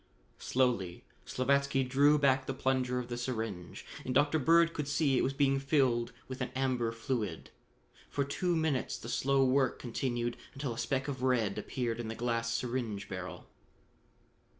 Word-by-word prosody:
Slowly 120 -9 0 0.2
Slavatsky 140 +1 +2
drew 145 +3 +5
back 135 -2 +3
the 135 - -2
plunger 130 -1 0
of 125 -1 -3
the 120 0 -4
syringe 110 -8 -4 0.2
and 125 - -3
Dr. 145 +3 +4
Bird 165 +3 +4
could 150 -2 -3
see 145 -2 +2
it - - +3
was 135 - 0
being 135 -1 +3
filled 130 -4 +2 0.2
with 130 0 -6
an 125 - -1
amber 130 -3 0
fluid. 115 - -3 0.6
For 140 - 0
two 175 +6 -1
minutes 160 -5 0
the - - -8
slow 135 0 +2
work 130 0 +2
continued, 120 -1 -2 0.2
until 135 -3 -3
a - - -10
speck 135 0 -1
of 135 -3 -4
red 120 -6 +1
appeared 120 -3 -3
in 120 - -4
the 110 - -4
glass 115 -1 -1
syringe 115 -4 -2
barrel. 90 -1 -6
130 Hz, 165 wpm, -32 LUFS, 120-140 Hz, 0.6 s, drew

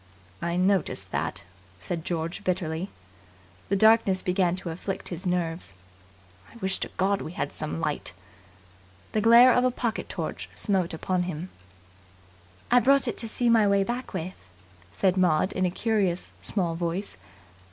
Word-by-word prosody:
"I 170 +1 -1
noticed 190 +1 +1
that," - - -2 0.3
said 160 - -4
George 165 0 -3
bitterly. 180 0 -2 0.8
The 200 - +2
darkness 220 -2 +4
began 180 -1 +1
to 185 -2 -5
afflict 185 +3 -4
his 180 +2 -5
nerves. 170 - -2 0.8
"I - - -18
wish 190 -4 0
to - - -2
God 195 +1 +1
we 160 - -6
had - - -3
some 80 +1 -4
light." - - -2 1.0
The 215 - +1
glare 235 +3 +8
of 250 - +3
a 255 - +4
pocket 235 -2 -3
torch - - -5
smote 185 -6 0
upon 180 +2 -1
him. 175 +2 -5 1.2
"I 245 - +7
brought 275 +2 +4
it 235 - -2
to 225 - -2
see 240 +2 -1
my 225 -3 +5
way 200 0 +3
back 240 +5 -4
with," 180 +3 -6 0.5
said 190 -1 +2
Maud 180 -1 +3
in 185 -1 +1
a - - 0
curious, 190 -2 0
small 180 -5 -1
voice. 170 - -3
185 Hz, 155 wpm, -26 LUFS, 175-220 Hz, 1.2 s, glare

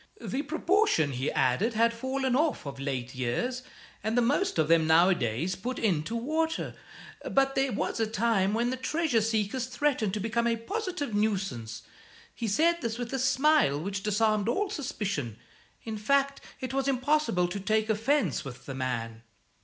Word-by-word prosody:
The 270 -6 -3
proportion, 320 - +2
he 130 +2 -2
added, 155 - +1
had 230 +1 +3
fallen 260 +2 -1
off 300 - +1
of 140 -1 -7
late 130 -2 -3
years, 130 - -2 0.4
and 220 +3 0
the - - +5
most 290 - +1
of 160 -2 +3
them 165 -1 +4
nowadays 160 - +3
put 245 +6 -4
in 185 -9 +1
to 230 - -4
water, 315 +7 -1 0.6
but 270 0 +2
there 270 -1 +1
was 220 - -2
a 225 - +1
time 215 -3 +1
when 240 +2 +1
the 260 - -2
treasure 260 -2 +1
seekers 220 +3 -1
threatened 250 -6 0
to - - -2
become 235 +3 0
a 230 - +2
positive 360 - -4
nuisance. 190 - -1 0.5
He 230 - -4
said 335 +11 +2
this 230 -1 -2
with 245 +1 -5
a 265 - 0
smile 260 - +3
which 195 +4 -3
disarmed 215 +1 +1
all 390 +10 0
suspicion. 200 - -3 0.5
In 220 -2 -5
fact, 275 +5 +1 0.2
it 260 0 -4
was 270 0 0
impossible 270 -8 +2
to 200 - -4
take 215 +2 +1
offence 225 - +1
with 135 -2 -9
the 135 - -5
man." 115 -3 -3
225 Hz, 170 wpm, -28 LUFS, 175-265 Hz, 0.6 s, the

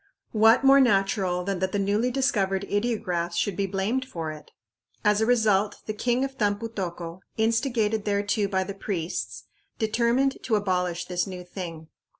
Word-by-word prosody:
What 225 +4 +5
more 275 0 +7
natural 195 -5 +2
than 195 0 -2
that 190 0 -1
the - - +1
newly 205 +5 +1
discovered 205 -7 0
ideographs 195 -6 -1
should 205 - 0
be 195 +1 -1
blamed 200 +7 -1
for 165 -11 -5
it? 155 -1 -11 0.6
As 210 0 +4
a 220 - +2
result, 215 -4 +3
the 215 - -3
king 245 +4 0
of 270 0 -8
Tampu 205 +2 0
tocco, 175 -4 -5 0.2
instigated 225 -1 +1
thereto 205 0 +1
by 190 -1 +1
the 200 +1 -6
priests, 160 - -4 0.3
determined 235 +5 +1
to 225 - 0
abolish 180 -4 0
this 180 +1 -1
new 180 -2 -7
thing. 170 -3 -7
205 Hz, 160 wpm, -26 LUFS, 180-225 Hz, 0.6 s, more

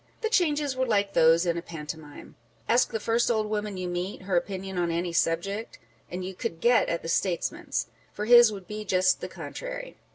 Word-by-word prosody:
The 445 - 0
changes 295 - +2
were 260 0 0
like 200 -3 +1
those 165 +2 +5
in 170 -1 0
a - - -7
pantomime. 155 -2 -9 0.3
Ask 240 +2 +3
the 220 - -3
first 230 +2 +1
old 220 -2 +1
woman 210 -2 -3
you 185 0 -3
meet 180 +2 -4
her 185 -1 -1
opinion 190 +1 -2
on 175 -1 +1
any 170 +1 -2
subject, 195 +7 -1 0.3
and 180 +1 -5
you 190 - -5
could 185 -4 -4
get 240 +5 +4
at 170 - -2
the - - -5
statesman's; 170 +1 -1 0.3
for 210 - -4
his 240 -1 +8
would 195 -3 -8
be 215 +2 -6
just 185 -2 +2
the - - -4
contrary. - - -7
195 Hz, 200 wpm, -27 LUFS, 175-230 Hz, 0.3 s, his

